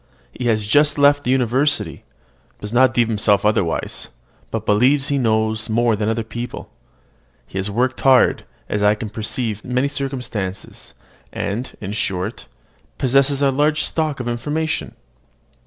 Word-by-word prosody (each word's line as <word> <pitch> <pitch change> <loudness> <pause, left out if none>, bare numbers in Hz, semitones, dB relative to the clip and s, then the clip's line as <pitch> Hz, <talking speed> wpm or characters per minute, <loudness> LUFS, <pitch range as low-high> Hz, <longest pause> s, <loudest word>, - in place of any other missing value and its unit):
He 125 - -4
has 110 -2 +1
just 145 +8 +3
left 145 0 +4
the - - -3
university, 130 +3 +1 0.6
does 105 +2 -7
not 130 +2 +5
deem 120 -2 +2
himself 105 -2 +2
overwise, 105 -6 0 0.4
but 110 -1 -4
believes 130 +7 +3
he 140 -1 +1
knows 110 -2 0
more 115 0 +2
than 105 +1 -1
other 115 0 -1
people. 120 +2 -7 0.7
He 95 - -6
has 95 +2 0
worked 125 +5 -1
hard, 130 -2 +4 0.2
as 105 - -2
I 105 +1 +4
can 105 0 -6
perceive 110 -1 -3
from 125 - -5
many 130 +2 +2
circumstances, 125 -9 -5 0.4
and, 110 +6 -4
in 100 -1 -5
short, 95 0 -3 0.5
possesses 135 +2 +2
a 135 - +4
large 150 +3 +1
stock 155 -4 -1
of 125 - -4
information. 150 +7 -2
120 Hz, 150 wpm, -20 LUFS, 105-135 Hz, 0.7 s, not